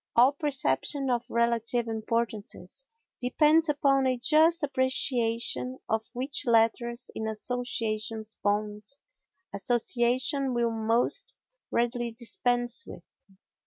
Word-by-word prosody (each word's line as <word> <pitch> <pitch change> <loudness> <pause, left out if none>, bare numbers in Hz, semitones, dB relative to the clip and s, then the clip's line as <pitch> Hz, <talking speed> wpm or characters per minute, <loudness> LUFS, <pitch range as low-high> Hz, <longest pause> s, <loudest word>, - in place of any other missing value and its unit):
All 245 +3 +6
perception 275 - -1
of 240 -1 -2
relative 235 0 +1
importances 225 - -3 0.3
depends 305 +6 +3
upon 275 -2 +2
a 255 -1 +1
just 315 +6 +4
appreciation 255 -2 0
of 220 0 0
which 265 +4 -1
letters 235 +1 +2
in 220 - -4
association's 220 -1 -2
bond 210 0 -1 0.7
association 245 +5 +1
will 235 -1 +1
most 225 - 0 0.3
readily 240 0 -1
dispense 245 - -1
with. - - -11
240 Hz, 95 wpm, -28 LUFS, 225-260 Hz, 0.7 s, All